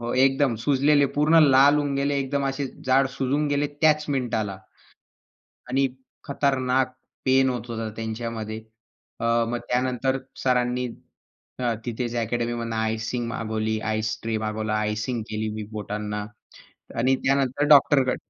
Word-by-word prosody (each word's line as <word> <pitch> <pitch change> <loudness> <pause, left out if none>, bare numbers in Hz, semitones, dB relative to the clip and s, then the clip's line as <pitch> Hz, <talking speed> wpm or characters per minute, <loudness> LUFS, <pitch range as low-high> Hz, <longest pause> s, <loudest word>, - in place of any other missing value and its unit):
हो 120 0 -3
एकदम 135 -2 +2
सुजलेले, 140 +4 +3
पूर्ण 155 +3 +5
लाल 135 +2 +6
होऊन 145 -2 0
गेले. 140 +1 0
एकदम 140 +1 -1
असे 135 +1 -2 0.2
जाड 135 +1 +4
सुजून 140 +3 0
गेले 145 0 +1
त्याच 155 -1 +4
मिनिटाला 110 -8 -1 1.1
आणि 135 +1 +2 0.4
खतरनाक 130 -2 0 0.3
पेन 130 0 +4
होत 120 -2 -4
होता 115 -1 -3
त्यांच्यामध्ये. 110 -1 -4 0.6
अ, - - -2 0.2
मग 120 0 -2
त्यानंतर 130 +1 0 0.3
सरांनी 125 -1 +1 0.7
अ, 120 -2 +1
तिथेच 120 0 -3
अकॅडमी 120 +1 -1
मधनं 115 -1 -3
आयसिंग 110 +2 -1
मागवली, 110 -1 -2
आइस 110 0 -2
ट्रे 115 -1 -1
मागवला, 110 0 -2
आयसिंग 105 +3 -1
केली 110 0 -2
मी 110 - -4
बोटांना. 105 0 -4 0.7
आणि 130 +3 +3
त्यानंतर 135 0 +2
डॉक्टरकडे 140 -3 +5
125 Hz, 130 wpm, -25 LUFS, 110-135 Hz, 1.1 s, लाल